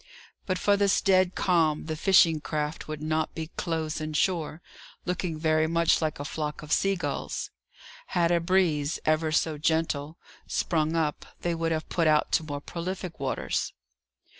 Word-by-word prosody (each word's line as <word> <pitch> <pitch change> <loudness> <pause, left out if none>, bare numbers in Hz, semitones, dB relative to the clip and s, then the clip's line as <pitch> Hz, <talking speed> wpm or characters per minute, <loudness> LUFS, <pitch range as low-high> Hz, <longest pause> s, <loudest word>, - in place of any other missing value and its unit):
But 185 -1 0
for 200 +2 +3
this 200 -1 +3
dead 185 -2 +3
calm, 165 -4 +2
the 155 -1 -3
fishing 165 -2 +4
craft 150 0 -3
would 155 -1 -5
not 155 0 -1
be 160 0 -5
close 160 -3 -2
in 155 0 -4
shore, 160 -1 0 0.5
looking 180 -2 -2
very 155 0 +2
much 170 0 +3
like 155 -3 -1
a 145 - -4
flock 150 0 -4
of 150 - -9
sea 195 +5 +3
gulls. 180 - -4 0.6
Had 170 -1 +1
a 170 - +4
breeze, 165 -4 +1
ever 155 0 +2
so 155 -1 +1
gentle, 160 -1 0 0.3
sprung 160 -1 0
up, 155 -3 -1
they 175 - 0
would 165 0 -1
have 155 -1 -2
put 165 -2 +1
out 150 -1 +3
to - - +2
more 145 -2 -5
prolific 180 +1 -5
waters. 135 -1 -2
160 Hz, 165 wpm, -27 LUFS, 155-175 Hz, 0.6 s, fishing